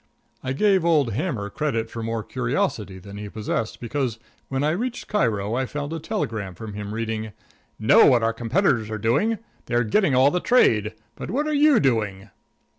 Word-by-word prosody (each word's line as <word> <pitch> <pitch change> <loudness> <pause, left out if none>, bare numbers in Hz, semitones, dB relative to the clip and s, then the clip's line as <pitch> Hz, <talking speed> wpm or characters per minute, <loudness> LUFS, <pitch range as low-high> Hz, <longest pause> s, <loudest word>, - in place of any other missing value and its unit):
I 130 0 -2
gave 195 +4 +3
old 150 -9 +2
Hammer 110 - -2
credit 115 -7 -2
for 115 - -5
more 115 -1 -3
curiosity 95 +9 -2
than 100 +2 -10
he 105 0 -6
possessed, 110 +1 -3
because 120 -1 -2 0.3
when 135 +1 -1
I 150 - +2
reached 240 +8 -3
Cairo 110 - 0
I 130 +2 0
found 145 +3 -4
a 165 - -3
telegram 110 - -3
from 110 0 -8
him 105 +1 -5
reading: 110 -1 -3 0.5
"_Know - - +6
what 120 -3 +3
our 115 0 +2
competitors 120 - +1
are 110 - -3
doing: 125 - +1 0.3
they 120 - -2
are 120 - +3
getting 135 - +2
all 130 +2 +5
the 180 - +1
trade. 110 - +3 0.2
But - - -7
what 275 +9 0
are 305 - -1
you 290 -3 +5
doing? 105 -6 0
115 Hz, 190 wpm, -24 LUFS, 110-155 Hz, 0.5 s, Know